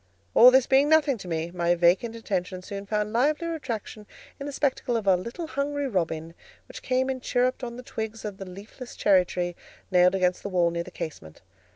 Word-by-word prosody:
All 245 Hz, -, +9 dB
this 260 Hz, 0 st, +4 dB
being 275 Hz, +2 st, +4 dB
nothing 300 Hz, -6 st, +3 dB
to 185 Hz, -, -9 dB
me, 165 Hz, 0 st, -3 dB
my 175 Hz, -1 st, +1 dB
vacant 180 Hz, +7 st, +2 dB
attention 185 Hz, -4 st, -3 dB
soon 200 Hz, 0 st, -7 dB
found 210 Hz, 0 st, -1 dB
livelier 305 Hz, +7 st, +1 dB
attraction 225 Hz, -7 st, -6 dB, 0.3 s
in 280 Hz, -, -5 dB
the -, -, -4 dB
spectacle 265 Hz, -4 st, 0 dB
of 220 Hz, -, -4 dB
a 190 Hz, -2 st, +5 dB
little 235 Hz, -, -5 dB
hungry 285 Hz, -1 st, -2 dB
robin, 165 Hz, -6 st, -2 dB, 0.3 s
which -, -, -10 dB
came 260 Hz, +1 st, 0 dB
and 260 Hz, -1 st, -3 dB
chirruped 255 Hz, +1 st, 0 dB
on 235 Hz, -1 st, -5 dB
the 250 Hz, -, -8 dB
twigs 220 Hz, -1 st, -6 dB
of 205 Hz, -2 st, -5 dB
the 195 Hz, -1 st, -7 dB
leafless 210 Hz, +7 st, -10 dB
cherry 190 Hz, -3 st, +4 dB
tree 175 Hz, -1 st, -3 dB, 0.4 s
nailed 180 Hz, 0 st, +5 dB
against 180 Hz, -1 st, +1 dB
the 200 Hz, -, -5 dB
wall 175 Hz, -2 st, +2 dB
near 170 Hz, 0 st, -2 dB
the -, -, -8 dB
casement. 80 Hz, -, -8 dB
210 Hz, 205 wpm, -26 LUFS, 180-255 Hz, 0.4 s, All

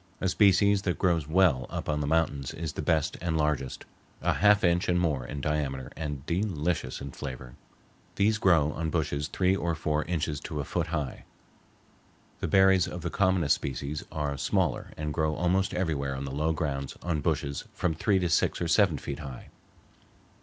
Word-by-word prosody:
A 95 Hz, -, 0 dB
species 100 Hz, +1 st, +4 dB
that 90 Hz, -3 st, -1 dB
grows 85 Hz, -5 st, +1 dB
well 80 Hz, -6 st, +3 dB
up -, -, -5 dB
on 75 Hz, -1 st, 0 dB
the 70 Hz, -, -2 dB
mountains 75 Hz, -4 st, 0 dB
is 80 Hz, -2 st, -4 dB
the -, -, -4 dB
best 80 Hz, -1 st, +1 dB
and 85 Hz, -2 st, 0 dB
largest, 75 Hz, -4 st, -1 dB, 0.4 s
a -, -, +3 dB
half 105 Hz, 0 st, +4 dB
inch 90 Hz, +2 st, +2 dB
and 90 Hz, 0 st, +3 dB
more 75 Hz, -7 st, 0 dB
in 70 Hz, +2 st, -5 dB
diameter 70 Hz, -3 st, -2 dB
and 75 Hz, -3 st, -5 dB
delicious 85 Hz, -6 st, -1 dB
in 70 Hz, -, -6 dB
flavor. 65 Hz, -1 st, -7 dB, 0.6 s
These 110 Hz, +2 st, +2 dB
grow 80 Hz, -7 st, +4 dB
on 80 Hz, +1 st, -3 dB
bushes 75 Hz, -3 st, -1 dB
three 90 Hz, +5 st, +1 dB
or 85 Hz, -3 st, -1 dB
four 75 Hz, 0 st, 0 dB
inches 80 Hz, -3 st, -2 dB
to 75 Hz, +1 st, -5 dB
a -, -, -1 dB
foot -, -, -2 dB
high. 75 Hz, -5 st, -3 dB, 1.2 s
The -, -, -2 dB
berries 95 Hz, -2 st, +5 dB
of 90 Hz, -, -6 dB
the -, -, -2 dB
commonest 95 Hz, -6 st, +3 dB
species 70 Hz, +3 st, -4 dB
are 75 Hz, -2 st, -2 dB
smaller -, -, 0 dB
and 75 Hz, -1 st, -3 dB
grow 80 Hz, -1 st, 0 dB
almost 90 Hz, +3 st, +1 dB
everywhere 75 Hz, -7 st, -1 dB
on 65 Hz, +1 st, -4 dB
the 70 Hz, -, -5 dB
low 75 Hz, +4 st, 0 dB
grounds 70 Hz, -4 st, -3 dB
on 85 Hz, -4 st, -1 dB
bushes 70 Hz, 0 st, -1 dB
from 90 Hz, -, -1 dB
three 95 Hz, +5 st, +1 dB
to 90 Hz, -2 st, 0 dB
six 85 Hz, -, +2 dB
or 85 Hz, -, -1 dB
seven 90 Hz, -3 st, +3 dB
feet 70 Hz, +2 st, -5 dB
high. 65 Hz, -5 st, -8 dB
80 Hz, 185 wpm, -28 LUFS, 70-90 Hz, 1.2 s, berries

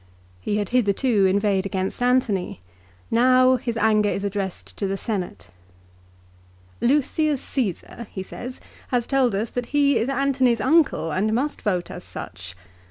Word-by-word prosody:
He 205 Hz, -, -2 dB
had 205 Hz, -2 st, -2 dB
hitherto 215 Hz, -2 st, +2 dB
inveighed 195 Hz, 0 st, +1 dB
against 190 Hz, +3 st, -3 dB
Antony. 245 Hz, -, +1 dB, 0.5 s
Now 255 Hz, +2 st, +5 dB
his 235 Hz, -2 st, -4 dB
anger 215 Hz, -1 st, +3 dB
is 195 Hz, -, -2 dB
addressed 190 Hz, -, -4 dB
to 195 Hz, -, -1 dB
the 195 Hz, +1 st, -2 dB
Senate. 185 Hz, -, -4 dB, 1.3 s
"Lucius 295 Hz, +3 st, +2 dB
Caesar," 235 Hz, -, -4 dB
he 190 Hz, -, -6 dB
said, 250 Hz, +6 st, -8 dB, 0.3 s
"has 245 Hz, -2 st, 0 dB
told 260 Hz, -5 st, +2 dB
us 215 Hz, +3 st, -2 dB
that 245 Hz, -1 st, -3 dB
he 285 Hz, -1 st, +3 dB
is 235 Hz, -, -1 dB
Antony's 265 Hz, -3 st, +2 dB
uncle 280 Hz, -, +2 dB
and 205 Hz, +6 st, 0 dB
must 285 Hz, +5 st, -2 dB
vote 180 Hz, -4 st, -1 dB
as -, -, -8 dB
such. 90 Hz, 0 st, -8 dB
225 Hz, 145 wpm, -23 LUFS, 195-255 Hz, 1.3 s, Now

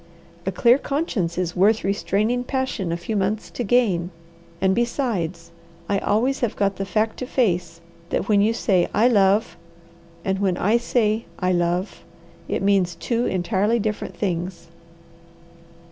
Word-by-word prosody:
A -, -, +2 dB
clear 235 Hz, +7 st, +4 dB
conscience 240 Hz, -, -2 dB
is 180 Hz, -2 st, -2 dB
worth 210 Hz, +4 st, +3 dB
restraining 210 Hz, +5 st, 0 dB
passion 255 Hz, -9 st, -2 dB
a 170 Hz, -, -1 dB
few 175 Hz, +6 st, -4 dB
months 205 Hz, +2 st, -1 dB
to 245 Hz, -, -3 dB
gain, 195 Hz, -7 st, +2 dB, 0.5 s
and 190 Hz, 0 st, +2 dB
besides, 195 Hz, -, -2 dB, 0.4 s
I 200 Hz, -1 st, +1 dB
always 245 Hz, +8 st, +1 dB
have 240 Hz, -4 st, -1 dB
got 200 Hz, -1 st, 0 dB
the 195 Hz, -, -3 dB
fact 220 Hz, +2 st, 0 dB
to 255 Hz, -, -5 dB
face 175 Hz, -10 st, 0 dB, 0.3 s
that 195 Hz, -, -1 dB
when 205 Hz, -2 st, +4 dB
you 215 Hz, +2 st, +3 dB
say 195 Hz, -6 st, +1 dB
'I 225 Hz, +5 st, +5 dB
love,' 205 Hz, -2 st, +3 dB, 0.7 s
and 190 Hz, 0 st, 0 dB
when 190 Hz, -3 st, +1 dB
I 215 Hz, +5 st, +3 dB
say 230 Hz, -2 st, 0 dB
'I 180 Hz, 0 st, 0 dB
love,' 175 Hz, +2 st, -1 dB, 0.4 s
it -, -, -2 dB
means 195 Hz, -3 st, +2 dB
two 235 Hz, +7 st, -1 dB
entirely 195 Hz, +5 st, +1 dB
different 215 Hz, -1 st, -3 dB
things. 175 Hz, -3 st, -3 dB
200 Hz, 150 wpm, -23 LUFS, 180-230 Hz, 0.7 s, I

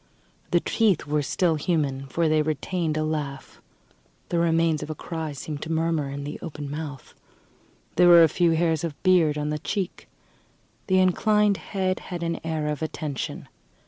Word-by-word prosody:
The -, -, +3 dB
teeth 210 Hz, -9 st, +1 dB
were 150 Hz, 0 st, 0 dB
still 165 Hz, +3 st, +1 dB
human, 145 Hz, -4 st, -1 dB
for 165 Hz, +5 st, 0 dB
they 155 Hz, 0 st, +3 dB
retained 155 Hz, +2 st, -1 dB
a 155 Hz, -, 0 dB
laugh. 150 Hz, -3 st, -4 dB, 0.7 s
The 170 Hz, -, +1 dB
remains 165 Hz, -2 st, +2 dB
of 150 Hz, -, -6 dB
a 155 Hz, -, -4 dB
cry 160 Hz, 0 st, -5 dB
seemed 145 Hz, +1 st, -6 dB
to 160 Hz, -, -5 dB
murmur 160 Hz, -3 st, 0 dB
in 140 Hz, +1 st, -5 dB
the 145 Hz, +1 st, -6 dB
open 145 Hz, -2 st, -6 dB
mouth. 145 Hz, -3 st, -7 dB, 0.8 s
There 180 Hz, -, +6 dB
were 170 Hz, -1 st, +9 dB
a -, -, +7 dB
few 170 Hz, +1 st, +2 dB
hairs 160 Hz, -1 st, +1 dB
of 160 Hz, -4 st, -4 dB
beard 175 Hz, -5 st, +4 dB
on 150 Hz, 0 st, -2 dB
the 150 Hz, -, -2 dB
cheek. 190 Hz, +3 st, -4 dB, 0.8 s
The 185 Hz, -2 st, +3 dB
inclined 205 Hz, +2 st, +3 dB
head 185 Hz, +2 st, -2 dB
had 175 Hz, -2 st, -6 dB
an 170 Hz, 0 st, -2 dB
air 160 Hz, -2 st, -2 dB
of 150 Hz, 0 st, -2 dB
attention. 155 Hz, -3 st, -4 dB
160 Hz, 175 wpm, -25 LUFS, 150-170 Hz, 0.8 s, were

